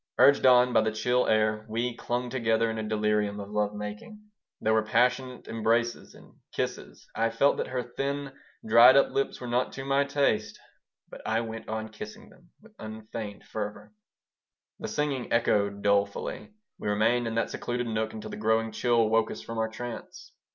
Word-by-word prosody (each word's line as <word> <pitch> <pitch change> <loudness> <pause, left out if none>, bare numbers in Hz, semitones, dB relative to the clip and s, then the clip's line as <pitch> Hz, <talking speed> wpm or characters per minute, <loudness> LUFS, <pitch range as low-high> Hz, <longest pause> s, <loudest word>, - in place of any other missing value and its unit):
Urged 140 -1 +6
on 125 0 +6
by - - +5
the 110 - 0
chill 125 +3 +1
air, 110 0 +2
we 120 +2 -1
clung 120 +1 -3
together 115 -2 +1
in 110 - -4
a 110 -1 -4
delirium 105 -1 0
of 100 0 -8
love 105 0 0
making. 105 - -7 0.4
There 110 - +1
were 110 - +4
passionate 125 +3 0
embraces 115 +1 0
and - - -17 0.2
kisses. - - -4
I 115 0 +1
felt 125 +5 +2
that - - -2
her 125 -1 -2
thin, 140 +3 -3 0.3
dried 115 +4 +8
up 140 - +4
lips 135 - -1
were 125 - -7
not 120 +1 0
to 135 - -6
my 140 +1 +3
taste, 140 -7 0 0.5
but - - -11
I 115 +1 0
went 115 -1 -7
on 110 0 -3
kissing 215 - -10
them 180 -2 -22
with 225 -1 -18
unfeigned 110 -1 -7
fervor. 105 0 -6 0.9
The - - -4
singing 140 -4 -2
echoed 100 -3 +1
dolefully. 100 0 0 0.3
We - - -5
remained 115 +3 +2
in 115 - -3
that 115 - 0
secluded 120 0 -3
nook 110 -1 -2
until 110 -1 -8
the - - -6
growing 110 +1 +1
chill 120 -2 +2
woke 110 0 +2
us - - -7
from 115 0 -5
our 110 0 0
trance. 120 +1 -8
115 Hz, 180 wpm, -28 LUFS, 110-125 Hz, 0.9 s, dried